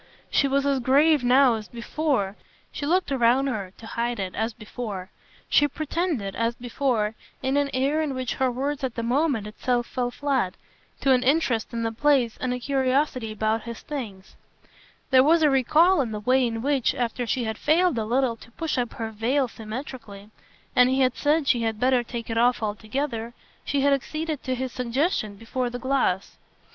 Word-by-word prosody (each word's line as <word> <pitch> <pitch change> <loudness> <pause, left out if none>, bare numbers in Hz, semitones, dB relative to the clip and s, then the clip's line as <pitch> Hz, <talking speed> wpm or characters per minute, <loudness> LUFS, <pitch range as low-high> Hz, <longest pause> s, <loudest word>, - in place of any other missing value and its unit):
She 280 - +3
was 275 +1 +1
as 280 -1 +2
grave 285 +3 +4
now 255 +1 +5
as 220 -2 -5
before; 235 -4 -1 0.4
she 285 - -4
looked 360 -1 +1
around 255 +1 +3
her, 205 -9 -3
to 225 - -12
hide 235 0 -2
it, 190 -2 -3
as 225 +2 -1
before; 215 -3 -7 0.4
she 290 - +4
pretended, 295 - -2
as 230 +1 0
before, 240 -3 -1 0.3
in 265 +1 0
an 285 -1 +2
air 275 +4 +1
in 290 -4 -2
which 255 -2 -2
her 260 - +4
words 270 +3 -3
at 255 -3 -2
the 230 - -3
moment 255 -2 +1
itself 240 +3 -1
fell 245 0 -2
flat, 260 -7 -1 0.5
to 270 - +3
an 255 -1 +4
interest 260 -4 +1
in 230 -1 -3
the 225 - -1
place 255 -1 +2
and 255 - -1
a 250 - -1
curiosity 260 -2 0
about 220 +1 0
his 235 -1 -7
"things"; 215 -10 -7 0.8
there 260 -1 +7
was 320 +3 +4
a 300 - +5
recall 305 +7 +4
in 240 -4 -2
the 210 - -4
way 255 +3 +3
in 225 0 -4
which, 280 -3 +1
after 240 0 -2
she 250 +2 0
had 220 -1 -4
failed 330 -4 +3
a - - -1
little 240 +2 +1
to 230 - -15
push 320 -3 -2
up 240 -1 -2
her 225 -1 -5
veil 250 +5 +1
symmetrically 220 -3 -8 0.4
and 250 0 +6
he 265 +1 +2
had 255 -1 +2
said 295 0 +1
she 240 -2 +3
had 225 -2 -1
better 255 0 +3
take 235 -1 -6
it 225 0 -1
off 240 -1 +3
altogether, 230 +3 -3 0.3
she 280 - 0
had 280 0 +4
acceded 310 +2 -3
to 260 - -2
his 260 0 -3
suggestion 250 - -1
before 240 +4 -3
the 245 - -5
glass. 250 -7 0
250 Hz, 195 wpm, -25 LUFS, 225-275 Hz, 0.8 s, there